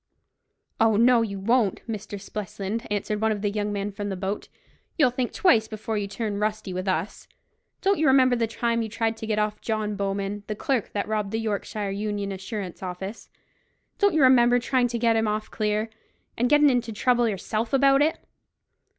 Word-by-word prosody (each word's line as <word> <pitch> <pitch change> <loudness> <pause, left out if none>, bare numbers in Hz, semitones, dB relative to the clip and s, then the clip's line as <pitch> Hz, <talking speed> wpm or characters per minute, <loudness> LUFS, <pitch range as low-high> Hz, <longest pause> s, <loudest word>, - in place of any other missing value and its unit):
"Oh, 220 -1 +4
no, 235 +2 +5
you 200 -3 -3
won't, 225 0 +1
Mr. 210 -2 -5
Spelsand," 200 +2 -5
answered 210 +1 -2
one 220 0 +2
of 205 -1 -3
the 205 - +1
young 210 0 -2
men 205 0 -2
from 205 0 -5
the 195 - -3
boat; 195 +2 -4 0.5
"you'll 275 -6 +4
think 250 -1 -2
twice 230 - +3
before 220 0 -4
you 205 -1 -1
turn 205 0 -3
rusty 215 -2 -2
with 185 +2 -4
us. 190 +2 -2 0.6
Don't 395 -2 +2
you 310 - +3
remember 260 -2 +5
the 230 -1 0
time 230 +1 -1
you 220 - -3
tried 225 +1 -1
to 220 - -6
get 215 -1 0
off 210 0 -1
John 215 -2 -2
Bowman, 200 +1 -2
the 215 - -3
clerk 260 -2 -1
that 205 -1 -2
robbed 210 -2 -1
the 225 +2 -2
Yorkshire 210 -1 -3
Union 205 0 -3
Assurance 190 -1 -6
Office—don't 195 - -5
you 310 - +4
remember 245 -2 +6
trying 245 0 +1
to 240 0 -3
get 230 -1 +2
him 225 -1 +1
off 215 0 -2
clear, 215 0 0 0.5
and 245 +1 +1
gettin' 295 -1 +6
into 240 -2 0
trouble 240 +2 +2
yourself 215 +3 -3
about 275 0 +4
it?" 310 +2 +2
215 Hz, 190 wpm, -25 LUFS, 205-240 Hz, 0.6 s, remember